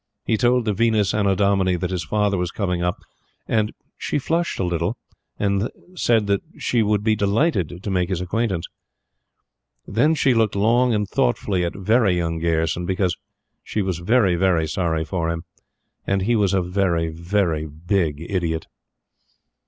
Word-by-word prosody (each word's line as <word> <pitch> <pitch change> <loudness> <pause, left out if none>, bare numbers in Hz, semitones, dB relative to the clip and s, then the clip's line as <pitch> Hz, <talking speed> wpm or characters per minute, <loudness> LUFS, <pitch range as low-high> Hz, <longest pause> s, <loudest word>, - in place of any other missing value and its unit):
He 110 - +2
told 120 +2 +2
the 105 - +1
Venus 110 -2 +2
Annodomini 100 -2 +2
that 90 +1 -3
his 90 -3 -2
father 105 +4 +1
was 90 -2 -1
coming 90 -3 -2
up, 90 0 0 0.5
and 110 -1 +1 0.3
she - - -1
flushed 165 +4 -1
a - - -1
little 90 +5 -1 0.4
and 100 +2 0 0.2
said 115 - +2
that 100 -1 +1 0.2
she 120 - 0
should 105 -1 +1
be 110 0 +3
delighted 100 - 0
to 100 - -3
make 90 -1 0
his 95 -3 -1
acquaintance. 95 -1 -1 1.2
Then 140 - +2
she 135 -4 +3
looked 110 -3 +2
long 120 +5 +3
and 105 -2 0
thoughtfully 90 +9 0
at 85 - -2
"Very 100 -1 +2
Young" 85 -1 -1
Gayerson; 80 +1 0
because 95 -2 0 0.5
she 105 - -2
was 95 -3 -2
very, 100 0 +3
very 85 -2 +2
sorry 80 0 -1
for 85 -1 -2
him, 85 0 -3 0.6
and 100 -1 +1
he 120 +4 +2
was 100 -3 +2
a 95 - +2
very, 90 -3 0
very 85 -1 -1
big 80 0 -1
idiot. 85 -4 -1
95 Hz, 160 wpm, -22 LUFS, 85-105 Hz, 1.2 s, be